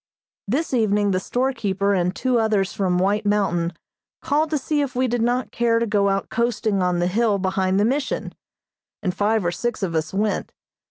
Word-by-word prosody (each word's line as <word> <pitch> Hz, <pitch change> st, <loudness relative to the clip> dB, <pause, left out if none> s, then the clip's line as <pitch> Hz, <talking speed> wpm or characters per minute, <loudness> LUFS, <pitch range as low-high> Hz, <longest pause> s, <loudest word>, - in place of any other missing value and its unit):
This 275 Hz, +8 st, -1 dB
evening 210 Hz, -4 st, +2 dB
the 185 Hz, -, +1 dB
storekeeper 200 Hz, -5 st, 0 dB
and 180 Hz, 0 st, 0 dB
two 255 Hz, -2 st, +1 dB
others 210 Hz, -4 st, +1 dB
from 185 Hz, -3 st, 0 dB
White 200 Hz, +3 st, +1 dB
Mountain 185 Hz, -5 st, +1 dB, 0.5 s
called 310 Hz, 0 st, 0 dB
to 305 Hz, -, 0 dB
see 295 Hz, +1 st, -1 dB
if 275 Hz, -3 st, -3 dB
we 255 Hz, +1 st, +2 dB
did 245 Hz, -1 st, -1 dB
not 245 Hz, +2 st, 0 dB
care 230 Hz, -1 st, +2 dB
to 230 Hz, -, +1 dB
go 205 Hz, -2 st, +2 dB
out 195 Hz, 0 st, -1 dB
coasting 220 Hz, -3 st, 0 dB
on 180 Hz, -1 st, +1 dB
the 175 Hz, -, +1 dB
hill 210 Hz, +3 st, +2 dB
behind 190 Hz, 0 st, 0 dB
the 205 Hz, -, +3 dB
Mission, 270 Hz, +4 st, -1 dB, 0.7 s
and 180 Hz, -3 st, 0 dB
five 210 Hz, 0 st, +1 dB
or 175 Hz, -, +1 dB
six 240 Hz, +4 st, -3 dB
of 175 Hz, -3 st, -1 dB
us 160 Hz, -1 st, -1 dB
went. 205 Hz, +2 st, -1 dB
210 Hz, 195 wpm, -22 LUFS, 190-240 Hz, 0.7 s, the